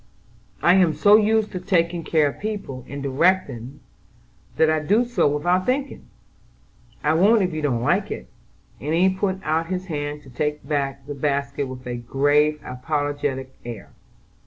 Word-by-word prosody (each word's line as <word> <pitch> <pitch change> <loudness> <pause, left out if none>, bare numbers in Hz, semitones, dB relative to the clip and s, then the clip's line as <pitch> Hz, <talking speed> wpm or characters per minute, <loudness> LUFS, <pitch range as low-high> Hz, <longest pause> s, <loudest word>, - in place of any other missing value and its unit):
"I 175 - +6
am 175 -5 +3
so 205 0 +6
used 215 0 +3
to 185 - -4
taking 175 -2 0
care 155 -3 +2
of - - -10
people, 200 - -5
and 140 0 -6
directing, 140 -3 0 0.7
that 160 - +4
I 155 0 +2
do 205 +11 +2
so 240 -8 +1
without 175 +6 +1
thinking. 270 +2 -2 1.0
I 150 +1 +3
won't 205 +6 +4
if 180 -2 -1
you 155 - -3
don't 125 -6 0
like - - +1
it," - - -5 0.5
and 150 +3 -1
he 185 +3 +4
put 190 0 -1
out 160 +1 0
his 185 +1 -3
hand 145 0 -4
to 135 - -14
take 150 +2 -3
back 140 -2 -2
the 145 - -5
basket 140 0 -1
with 130 0 -9
a 120 -1 -4
grave, 145 +5 +2
apologetic 145 -1 -3
air. 115 -3 -8
150 Hz, 165 wpm, -23 LUFS, 140-185 Hz, 1.0 s, I